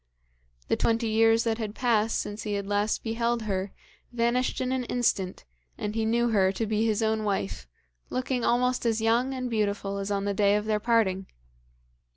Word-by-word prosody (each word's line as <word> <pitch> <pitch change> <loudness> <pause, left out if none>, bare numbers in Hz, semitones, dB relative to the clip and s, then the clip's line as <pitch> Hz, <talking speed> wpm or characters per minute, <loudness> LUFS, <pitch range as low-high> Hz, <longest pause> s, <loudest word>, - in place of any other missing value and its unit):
The - - +2
twenty 230 0 +1
years 225 +1 +4
that 225 0 -1
had 215 -1 -4
passed 225 -3 +1
since 205 +1 -5
he 210 -1 -3
had 200 -1 -2
last 205 +1 0
beheld 235 +1 -1
her 195 -2 -2 0.4
vanished 240 +1 0
in 255 -1 -1
an 260 -1 0
instant, 210 - -1 0.3
and 210 - -3
he 225 0 0
knew 235 +2 +2
her 195 -4 +3
to 225 - -2
be 215 0 0
his 225 -1 +1
own 220 0 +1
wife, 95 - -2 0.4
looking 255 -1 -2
almost 250 +2 +2
as 230 -2 +1
young 230 +4 +2
and 255 -1 -3
beautiful 205 -3 -1
as 195 0 -3
on 200 -1 -1
the 200 - 0
day 200 0 +3
of 210 0 -1
their 215 -1 +1
parting. 210 -4 +1
220 Hz, 190 wpm, -27 LUFS, 205-235 Hz, 0.4 s, years